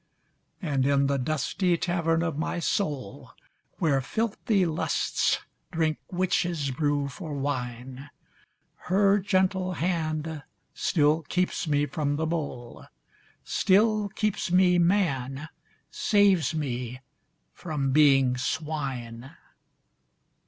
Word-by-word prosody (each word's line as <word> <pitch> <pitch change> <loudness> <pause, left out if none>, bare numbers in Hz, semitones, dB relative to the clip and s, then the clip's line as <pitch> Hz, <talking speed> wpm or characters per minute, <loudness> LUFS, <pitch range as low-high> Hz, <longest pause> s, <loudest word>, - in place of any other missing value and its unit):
And 140 -5 0
in 140 0 +3
the 140 0 +1
dusty 155 +6 0
tavern 165 -1 0
of 165 -4 -2
my 155 +4 -2
soul 150 - -3 0.4
Where 140 -5 +2
filthy 210 - 0
lusts 160 -2 0 0.3
drink 160 -2 0
witches' 175 -5 0
brew 145 +1 0
for 155 +2 -7
wine, 130 -1 -4 0.8
Her 200 +2 +4
gentle 185 -1 +1
hand 160 -3 -2 0.3
still 155 0 +2
keeps 180 +3 -1
me 145 -1 +2
from 145 0 -2
the 160 +2 -1
bowl, 145 -7 -5 0.6
Still 210 +1 +2
keeps 210 -3 -2
me 180 -1 +4
man, 155 -6 0 0.4
saves 195 - +3
me 125 -4 -3 0.5
from 150 -5 -2
being 135 -3 +4
swine. 130 -4 -4
155 Hz, 100 wpm, -27 LUFS, 140-180 Hz, 0.8 s, Her